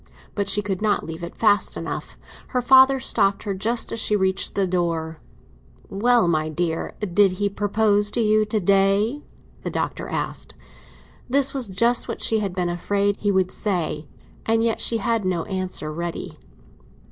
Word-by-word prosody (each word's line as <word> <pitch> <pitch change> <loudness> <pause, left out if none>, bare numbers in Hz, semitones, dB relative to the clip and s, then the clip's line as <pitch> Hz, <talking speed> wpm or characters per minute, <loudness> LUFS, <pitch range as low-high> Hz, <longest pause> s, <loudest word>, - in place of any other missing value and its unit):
But 200 -1 -2
she 205 +1 +2
could 195 -2 -3
not 215 -1 0
leave 165 +1 -7
it 170 - -8
fast 210 -2 +2
enough; - - -6 0.3
her 250 - -1
father 265 +1 +6
stopped 200 -6 +3
her 200 - -3
just 225 +5 -1
as 230 - -3
she 210 - +2
reached 190 -1 0
the 195 - +1
door. 165 -3 -2 0.7
"Well, 235 +1 +2
my 155 -2 0
dear, 165 +1 -3 0.2
did 200 -1 +4
he 205 +2 -1
propose 205 +1 +2
to - - +2
you 215 -1 +3
to 215 0 -1
day?" 200 +7 +2 0.4
the - - -4
Doctor - - -3
asked. - - -4 0.7
This 275 +1 +3
was 265 -4 -2
just 230 +5 +1
what - - -5
she 220 - +3
had 195 -3 -3
been 180 -1 -1
afraid 200 +3 -1
he 205 - 0
would 190 -1 +1
say; 165 -7 -2 0.4
and 225 0 +1
yet 230 -1 0
she 230 - +2
had 230 -2 -1
no 180 -3 -1
answer 185 -5 -3
ready. 170 +1 -5
200 Hz, 170 wpm, -22 LUFS, 180-220 Hz, 0.7 s, father